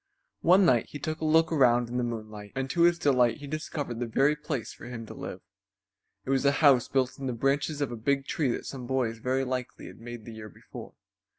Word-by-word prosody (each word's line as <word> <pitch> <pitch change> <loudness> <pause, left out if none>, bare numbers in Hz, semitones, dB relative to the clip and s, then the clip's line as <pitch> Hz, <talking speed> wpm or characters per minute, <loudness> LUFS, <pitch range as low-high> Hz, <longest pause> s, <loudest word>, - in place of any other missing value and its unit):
One 185 +3 +5
night 120 -8 +3
he - - -7
took 155 +2 -4
a - - -1
look 160 +1 +4
around 120 -5 +4
in 120 +1 -4
the 125 - 0
moonlight, 110 -3 -6
and 135 +1 -2
to 170 - 0
his 170 0 +5
delight 125 -7 +3
he 145 - -9
discovered 145 -4 -4
the 120 - -2
very 135 +6 +3
place 150 -5 -4
for - - -12
him 120 -2 -7
to - - -9
live. 90 - -7 0.8
It 135 - -2
was 135 -1 +2
a 140 0 +4
house 140 -5 +4
built 130 -1 0
in 135 - -4
the 125 - -1
branches 140 +4 0
of 140 - -1
a - - -4
big 135 +4 0
tree 145 -3 0
that 120 - -3
some 125 -3 -7
boys 120 -4 -1
very 130 +3 0
likely 125 -1 -4
had - - -11
made 120 -1 -8
the 115 - -9
year 110 -1 -9
before. - - -11
130 Hz, 235 wpm, -28 LUFS, 120-145 Hz, 0.8 s, One